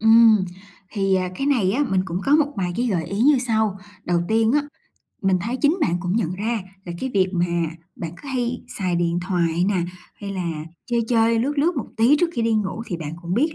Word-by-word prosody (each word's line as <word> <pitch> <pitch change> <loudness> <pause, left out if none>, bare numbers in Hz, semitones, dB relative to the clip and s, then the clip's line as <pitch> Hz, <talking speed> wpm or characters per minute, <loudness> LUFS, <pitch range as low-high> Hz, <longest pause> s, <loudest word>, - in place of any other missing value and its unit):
Ừm, 225 -2 +6 0.5
thì, 195 -2 +1
à, 185 -1 +1
cái 275 - -2
này 230 -10 +2
á, 275 +7 +1
mình 190 -1 +3
cũng 180 -1 -3
có 285 +2 +5
một 295 -1 +1
vài 180 -3 -1
cái 245 +1 0
gợi 180 -7 0
ý 195 +5 -4
như 280 +3 +5
sau. 220 -5 0 0.3
Đầu 175 -1 +1
tiên 225 +1 +3
á, 295 +1 +3 0.6
mình 190 -2 +3
thấy 230 +7 -2
chính 295 +7 +2
bạn 175 - +2
cũng 180 +3 -1
nhận 185 -6 0
ra 220 +4 -1 0.2
là 175 - -5
cái 260 - -2
việc 190 -1 +3
mà 175 -1 +1 0.5
bạn 165 -1 -5
cứ 285 - -9
hay 250 -2 -2 0.2
xài 185 -3 0
điện 170 0 0
thoại 175 -2 0
nè, 190 -4 +1 0.4
hay 200 -1 -5
là 180 -3 -2 0.4
chơi 240 -1 +1
chơi, 230 -1 +3
lướt 280 +5 -1
lướt 330 +4 +2
một 265 - -2
tí 235 +6 +5
trước 340 +2 +1
khi 235 - -1
đi 225 0 +2
ngủ, 210 +1 -1
thì 175 - -3
bạn 155 -2 -6
cũng 175 +1 -2
biết 305 +8 +1
215 Hz, 235 wpm, -22 LUFS, 185-245 Hz, 0.6 s, Ừm